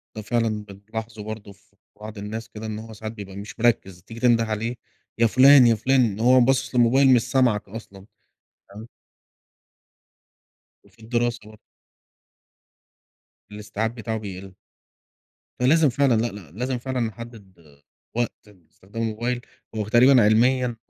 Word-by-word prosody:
ده 110 - -5
فعلًا 110 -1 -1
بنلاحظه 110 +2 -8
برضه 105 -1 -8
في 100 0 -24 0.3
بعض 110 0 -9
الناس 110 +3 -6
كده، 110 +1 -9
إن 110 0 -5
هو 110 0 -10
ساعات 110 +1 -7
بيبقى 100 -3 -10
مش 100 +3 -9
مركّز، 95 -6 0
تيجي 115 0 -11
تنده 120 -2 +3
عليه 110 +2 -3 0.4
يا 115 - +4
فُلان، 130 +2 +7
يا 115 - +4
فُلان، 120 -4 +1
وهو 125 +3 +5
باصِص 130 +1 +1
للموبايل 130 +3 +5
مش 120 - +4
سامعك 120 -7 +1
أصلًا، 100 -2 -11 0.6
فاهم؟ 105 +3 -11 2.0
وفي - - -26
الدراسة 120 +1 -1
برضه. 110 0 -15 1.9
الاستيعاب 105 +2 -4
بتاعُه 110 -1 -4
بيقِلّ. 95 -2 -8 1.1
فلازم 150 +4 +4
فعلًا 135 0 +2
لأ، 120 - 0
لأ 100 -9 -11
لازم 125 +6 -3
فعلًا 130 +1 -4
نحدِّد 115 -5 -7 0.6
وقت 120 -1 0 0.2
لاستخدام 100 +3 -11
الموبايل، 120 +3 -2 0.3
هو 105 -1 -3
تقريبًا 125 +2 +5
علميًا، 120 +3 +2
115 Hz, 135 wpm, -23 LUFS, 105-120 Hz, 2.0 s, فُلان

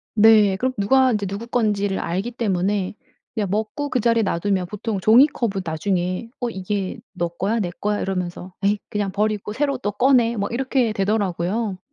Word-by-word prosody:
네. 210 -2 +6
그럼 255 +3 -1
누가 260 +6 +4
이제 205 -2 -1
누구 200 +4 -5
건지를 205 -5 0
알기 190 +8 -2
때문에 200 -4 -1 0.4
그냥 215 -3 -1
먹고 220 +8 -2
그 255 - 0
자리에 230 0 +3
놔두면 190 0 0
보통 210 +1 -3
종이컵은 225 -2 +4
나중에 180 +4 -2
어 245 - 0
"이게 195 +1 -3
너 175 -2 -1
거야, 195 +7 -1
내 185 -5 -1
거야?" 210 0 -1
이러면서 180 -1 -4
"에이 205 +1 +2
그냥 205 -2 -2
버리고 210 0 -1
새로 275 +2 0
또 205 -5 -2
꺼내." 240 0 +3
뭐 200 -1 -2
이렇게 255 -1 +1
되더라고요. 195 0 -1
210 Hz, 355 characters per minute, -22 LUFS, 190-230 Hz, 0.4 s, 네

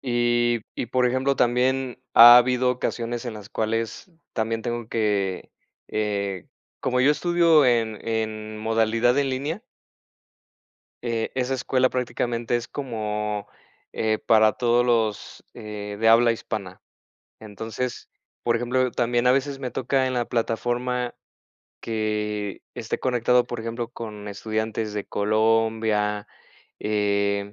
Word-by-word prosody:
y 120 -1 +1
y, - - -3
por 125 +2 +1
ejemplo, 130 +2 +1
también 125 +1 +1
ha 120 +1 +11
habido 125 +1 +3
ocasiones 120 -1 -3
en 120 -3 -5
las 105 -2 -10
cuales 115 - -3 0.2
también 115 0 -2
tengo 120 -1 -4
que, 100 -5 -1 0.4
eh 100 -3 -2 0.3
como 125 -1 0
yo 140 - +5
estudio 170 -2 +4
en 115 -3 +1
en 110 -1 -3
modalidad 115 +3 +2
en 140 -1 +1
línea 145 +9 -3 1.4
eh, 115 -1 -1
esa 130 0 0
escuela 130 0 +1
prácticamente 120 -1 -2
es 120 0 -3
como, 105 -5 -3 0.5
eh, 110 -1 0
para 110 -1 +5
todos 120 0 +2
los, 115 -4 -1
eh, 105 -1 -7
de 115 - +2
habla 115 +1 +6
hispana. 100 -5 -6 0.6
Entonces, 110 +3 -6 0.3
por 120 -1 +1
ejemplo, 125 +2 +1
también 120 0 0
a - - +6
veces 135 +1 0
me 130 -2 -3
toca 130 +2 0
en 130 - -2
la 120 -1 0
plataforma 120 +2 -1 0.7
que 105 -2 -2
esté - - -4
conectado, 125 -1 +2
por 120 - -5
ejemplo, 115 +1 -4
con 105 -3 -8
estudiantes 110 +1 -3
de 105 -1 -3
Colombia, 110 -1 +1 0.5
eh, 100 -1 0
115 Hz, 125 wpm, -24 LUFS, 110-125 Hz, 1.4 s, ha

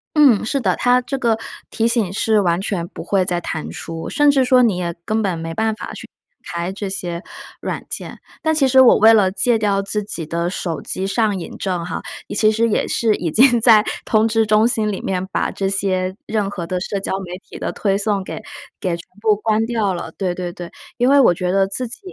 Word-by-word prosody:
嗯， 280 -9 +5
是 275 +5 -1
的。 190 -8 +1
它 245 0 +3
这 270 +2 -4
个 235 -4 +1 0.3
提 225 - 0
醒 230 -6 0
是 215 +2 +2
完 175 -2 +1
全 190 -3 -2
不 - - -9
会 195 -2 +1
再 175 -1 -1
弹 160 -2 -5
出， 165 0 -6
甚 295 0 +3
至 275 -2 +4
说 255 0 +5
你 225 -6 +3
也 175 -1 -2
根 220 +1 0
本 185 -5 -1
没 165 0 -5
办 220 +4 0
法 215 - -7
去 - - -9
打 170 - -12
开 180 - -3
这 200 0 -5
些 175 -2 -4 0.4
软 - - -4
件。 - - -6 0.2
但 315 - +1
其 295 -4 +3
实 260 0 +6
我 255 - +7
为 220 +1 +7
了 200 -4 +4
戒 235 +4 +2
掉 205 -2 +1
自 210 +1 -2
己 175 -5 -5
的 170 +2 -2
手 170 -3 -4
机 190 +1 -3
上 205 -1 0
瘾 170 - -8
症 180 -3 -2
哈， - - -4 0.3
其 215 +1 +4
实 225 +2 +1
也 220 - +1
是 225 -3 +2
已 165 -3 -3
经 240 - +5
在 220 -2 +6 0.2
通 220 0 +2
知 225 0 +2
中 215 +1 +4
心 220 -3 0
里 195 - -4
面 185 -1 -2
把 - - 0
这 195 -1 -2
些 185 -1 -1
任 210 -3 -1
何 180 -4 -5
的 185 - -2
社 200 +1 -3
交 195 - -3
媒 180 0 -7
体 - - -9
的 - - -3
推 195 -2 0
送 200 -1 0
给 - - -6 0.4
给 185 - -1
全 170 - -11 0.2
部 215 -1 +3
关 220 +1 +1
掉 225 -4 0
了， 175 -2 -6
对 185 -3 -1
对 180 -1 -4
对。 175 -1 -8 0.3
因 245 0 +2
为 280 +1 +6
我 210 - +5
觉 180 0 -2
得 195 0 +3
自 245 +6 -3
己 230 - -8
205 Hz, 250 characters per minute, -19 LUFS, 185-225 Hz, 0.4 s, 我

